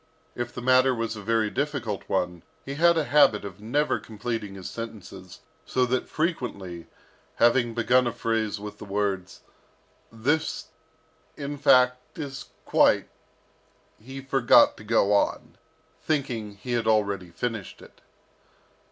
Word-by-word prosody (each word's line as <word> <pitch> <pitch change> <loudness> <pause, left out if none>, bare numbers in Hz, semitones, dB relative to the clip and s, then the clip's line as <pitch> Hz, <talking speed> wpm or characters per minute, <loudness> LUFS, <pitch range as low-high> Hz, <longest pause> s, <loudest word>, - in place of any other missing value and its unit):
If 120 0 -4
the 120 0 -7
matter 130 0 +4
was 115 -1 -3
a 105 - -7
very 110 0 +1
difficult 140 -8 -3
one, 90 -2 -1 0.2
he 135 - -5
had 170 +3 +4
a 160 - +2
habit 130 -7 +4
of 100 0 -9
never 145 +8 0
completing 110 -2 -5
his 95 -2 -7
sentences, 95 -5 -9 0.2
so 130 -1 +1
that 125 +1 -1
frequently, 100 - -3 0.5
having 120 0 +3
begun 125 +2 +3
a - - 0
phrase 110 -3 -1
with 105 0 -8
the - - -8
words, 100 -2 -2 0.7
"This, 145 +8 -1 0.7
in 145 0 -4
fact, 125 -2 +3
is 140 -3 -6 0.2
quite - - +3 0.5
" - - -35
he 135 +4 -8
forgot 135 -3 +5
to - - -12
go 105 -2 +2
on, 100 - 0 0.5
thinking 125 -9 -2
he 125 +5 -7
had 120 -2 0
already 100 -4 +1
finished 105 +3 -5
it. - - -17
115 Hz, 140 wpm, -26 LUFS, 105-130 Hz, 0.7 s, forgot